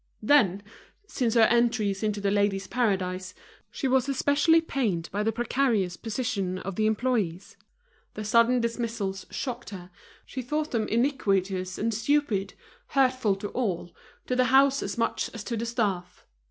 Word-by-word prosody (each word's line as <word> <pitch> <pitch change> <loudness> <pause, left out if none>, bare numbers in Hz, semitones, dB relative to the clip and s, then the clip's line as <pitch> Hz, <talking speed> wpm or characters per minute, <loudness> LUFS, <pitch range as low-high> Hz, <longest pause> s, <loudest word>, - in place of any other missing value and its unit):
Then, 205 -7 +4 0.4
since 245 - -1
her 230 - +6
entry 230 -3 +3
into 210 -1 -1
The 200 0 0
Ladies' 200 -1 +1
Paradise, 190 -6 -1 0.3
she 275 - -3
was 265 +1 +2
especially 285 +4 +3
pained 225 - -1
by 205 - -1
the 220 +1 +1
precarious 235 -5 0
position 215 -5 -3
of 195 0 -6
the 215 +2 +1
employees; 215 -6 -1 0.6
the 215 - -5
sudden 230 +3 +4
dismissals 230 -4 -3
shocked 245 -3 -5
her, 185 -3 -9 0.3
she 260 - -5
thought 300 +5 -2
them 225 -3 0
iniquitous 195 -7 0
and 225 +2 -1
stupid, 220 -4 0 0.3
hurtful 255 -6 +2
to 200 +1 -6
all, 185 -8 -2 0.3
to 250 - -1
the 255 0 +3
house 270 +2 +4
as 200 +2 -4
much 230 - -1
as 225 - -6
to 235 - -3
the 230 +1 -3
staff. 195 -7 -2
225 Hz, 155 wpm, -27 LUFS, 195-250 Hz, 0.6 s, her